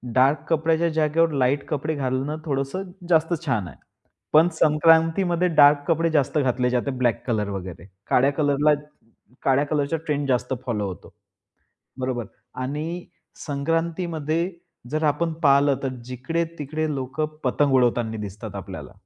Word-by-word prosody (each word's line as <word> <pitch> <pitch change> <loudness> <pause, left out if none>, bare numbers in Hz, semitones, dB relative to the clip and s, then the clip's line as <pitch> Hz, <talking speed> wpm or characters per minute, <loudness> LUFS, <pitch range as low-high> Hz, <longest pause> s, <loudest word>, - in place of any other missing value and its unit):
Dark 135 +4 +4
कपड्याच्या 165 +1 +2
जागेवर 160 +1 +2
light 140 0 +1
कपडे 150 +1 -2
घालणं 135 +2 -2
थोडंसं 140 +5 -2 0.3
जास्त 165 0 +3
छान 110 - 0
आहे. 80 - -12 0.6
पण 155 +2 +7
संक्रांतीमध्ये 165 +3 +3
डार्क 145 -3 +5
कपडे 165 0 +2
जास्त 150 0 +1
घातले 125 -2 +1
जाते. 125 +3 0
ब्लॅक 120 -4 0
कलर 105 -4 0
वगैरे, 95 -3 -6 0.2
काळ्या 135 +3 +4
कलरला 145 0 +3 0.7
काळ्या 135 +2 +3
कलरचा 145 +1 0
ट्रेण्ड 145 -2 -1
जास्त 125 0 0
फॉलो 105 -5 -1
होतो. 90 - -9 0.9
बरोबर 125 -2 -2 0.4
आणि 155 +6 -4 0.4
संक्रांतीमध्ये 165 +2 -1 0.4
जर 155 +2 -1
आपण 165 +3 +1
पाहिलं, 140 -1 +4
तर 135 - 0 0.2
जिकडे-तिकडे 155 +4 -3
लोकं 135 +3 -2 0.2
पतंग 140 +2 +2
उडवताना 120 -3 +2
दिसतात 100 -1 -7
आपल्याला. - - -8
145 Hz, 130 wpm, -24 LUFS, 130-160 Hz, 0.9 s, पण